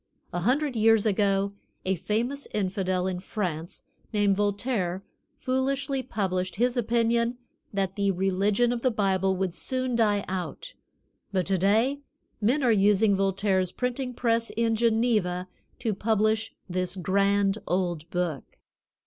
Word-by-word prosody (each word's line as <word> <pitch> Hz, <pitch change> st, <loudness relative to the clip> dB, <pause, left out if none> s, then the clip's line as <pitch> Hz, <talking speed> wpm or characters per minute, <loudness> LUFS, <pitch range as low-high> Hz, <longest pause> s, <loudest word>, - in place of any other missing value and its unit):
A 175 Hz, -, -1 dB
hundred 260 Hz, -, +1 dB
years 225 Hz, -1 st, +4 dB
ago 200 Hz, -1 st, +1 dB, 0.3 s
a 190 Hz, -, +2 dB
famous 225 Hz, -, -2 dB
infidel 185 Hz, -2 st, 0 dB
in 185 Hz, -1 st, -2 dB
France, 175 Hz, -4 st, -4 dB, 0.3 s
named 205 Hz, -2 st, +2 dB
Voltaire, 200 Hz, -2 st, -1 dB, 0.3 s
foolishly 265 Hz, 0 st, -1 dB
published 185 Hz, -7 st, -2 dB
his 245 Hz, +4 st, +1 dB
opinion 235 Hz, 0 st, +1 dB, 0.3 s
that 195 Hz, -1 st, -1 dB
the 200 Hz, -1 st, +1 dB
religion 195 Hz, +5 st, +2 dB
of 235 Hz, -, -3 dB
the 255 Hz, -, +3 dB
Bible 195 Hz, -4 st, +1 dB
would 185 Hz, -2 st, -1 dB
soon 255 Hz, +4 st, -1 dB
die 210 Hz, -3 st, +2 dB
out, 190 Hz, -, -5 dB, 0.6 s
but 185 Hz, -3 st, 0 dB
to 190 Hz, -1 st, +1 dB
day 225 Hz, +9 st, +2 dB, 0.4 s
men 255 Hz, +7 st, +2 dB
are 245 Hz, -, +4 dB
using 205 Hz, 0 st, +4 dB
Voltaire's 195 Hz, -1 st, +1 dB
printing 250 Hz, +2 st, -3 dB
press 230 Hz, -1 st, +1 dB
in 225 Hz, +1 st, 0 dB
Geneva 220 Hz, -6 st, +1 dB, 0.3 s
to 230 Hz, -3 st, -1 dB
publish 215 Hz, +1 st, +1 dB, 0.2 s
this 180 Hz, 0 st, -2 dB
grand 200 Hz, +2 st, +2 dB
old 175 Hz, -3 st, -1 dB
Book. 175 Hz, -6 st, -3 dB
205 Hz, 130 wpm, -27 LUFS, 190-235 Hz, 0.6 s, years